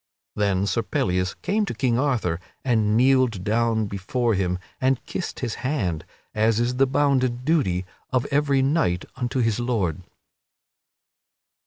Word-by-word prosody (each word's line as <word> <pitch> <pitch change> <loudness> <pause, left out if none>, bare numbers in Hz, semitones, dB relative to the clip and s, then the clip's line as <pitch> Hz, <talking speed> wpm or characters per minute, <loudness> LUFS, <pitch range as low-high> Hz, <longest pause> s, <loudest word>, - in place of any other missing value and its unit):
Then 100 -2 +1
Sir 115 +3 0
Pellias 90 -4 -1
came 210 +2 +1
to - - -4
King 125 -3 +1
Arthur 120 - 0 0.3
and 110 -4 +2
kneeled 130 -6 +3
down 110 +1 +1
before 105 +5 -1
him 90 -2 0 0.2
and 130 -1 +1
kissed 180 - -5
his 120 -4 -2
hand, 100 - -1 0.3
as 110 +1 +2
is 120 +1 0
the 135 +1 +4
bounden 130 -3 +1
duty 110 - +1 0.2
of 130 0 0
every 140 -2 +2
knight 135 - +1
unto 125 0 -1
his 115 -1 +1
lord. 105 -10 -1
120 Hz, 140 wpm, -24 LUFS, 100-130 Hz, 0.3 s, the